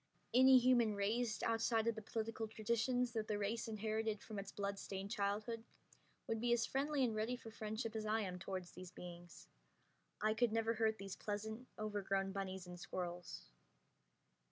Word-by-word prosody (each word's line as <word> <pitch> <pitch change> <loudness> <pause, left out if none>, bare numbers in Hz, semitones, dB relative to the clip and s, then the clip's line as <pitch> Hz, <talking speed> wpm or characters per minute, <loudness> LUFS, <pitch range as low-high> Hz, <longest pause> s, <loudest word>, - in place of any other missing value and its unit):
Any 260 +1 +9
human 240 -4 +5
raised 220 +3 0
outside 225 0 +2
of 230 - +3
the 220 - -6
political 225 +1 -2
traditions 235 +3 +1
that 220 -2 -2
the 210 - 0
race 210 +3 -1
inherited 220 -1 -1
from 215 -2 -5
its 195 0 -6
bloodstained 200 -1 -3
childhood 215 +1 -1 0.6
would 225 -1 -1
be 240 0 +2
as 235 0 +3
friendly 280 +1 +1
and 235 -3 +2
ready 220 +3 0
for 225 - -10
friendship 220 +1 -3
as 215 -1 -2
I 220 +1 +2
am 180 -3 -3
toward 185 +1 -3
these 180 +1 -9
beings. 175 -1 -10 0.7
I 215 +1 +3
could 235 0 +3
never 225 0 +2
hurt 220 -1 +2
these 195 -2 -5
pleasant, 220 +4 -4
overgrown 195 -2 0
bunnies 190 -1 -3
and 180 0 -8
squirrels. 175 -1 -4
215 Hz, 165 wpm, -40 LUFS, 200-230 Hz, 0.7 s, Any